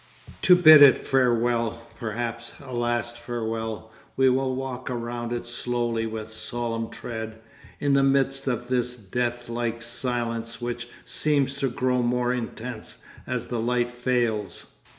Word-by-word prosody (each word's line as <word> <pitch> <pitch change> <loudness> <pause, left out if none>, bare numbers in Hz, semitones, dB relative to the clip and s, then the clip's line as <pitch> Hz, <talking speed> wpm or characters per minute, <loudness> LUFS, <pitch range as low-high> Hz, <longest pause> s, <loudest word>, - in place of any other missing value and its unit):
To 180 - +7
bid 155 -4 +9
it 140 -2 +9
farewell, 120 -3 +1 0.2
perhaps 115 +1 -4
a 130 -3 -9
last 120 0 -1
farewell, 115 -2 -4 0.3
we 130 -1 +5
will 130 0 0
walk 130 -1 -5
around 120 -1 -4
it 120 0 -3
slowly 120 -1 -1
with 110 0 -6
solemn 115 0 -3
tread, 110 -1 -6 0.4
in 145 -1 +2
the 140 - +5
midst 135 0 +2
of 120 -1 -1
this 125 -1 0
deathlike 120 +2 -2
silence 120 -1 -2
which 120 0 -4 0.2
seems 140 -3 +2
to 135 - +1
grow 125 +1 +1
more 125 +1 +1
intense 120 -1 -5 0.2
as - - -2
the 120 - -3
light 120 +1 0
fails. 120 -4 -1
120 Hz, 135 wpm, -25 LUFS, 115-125 Hz, 0.4 s, bid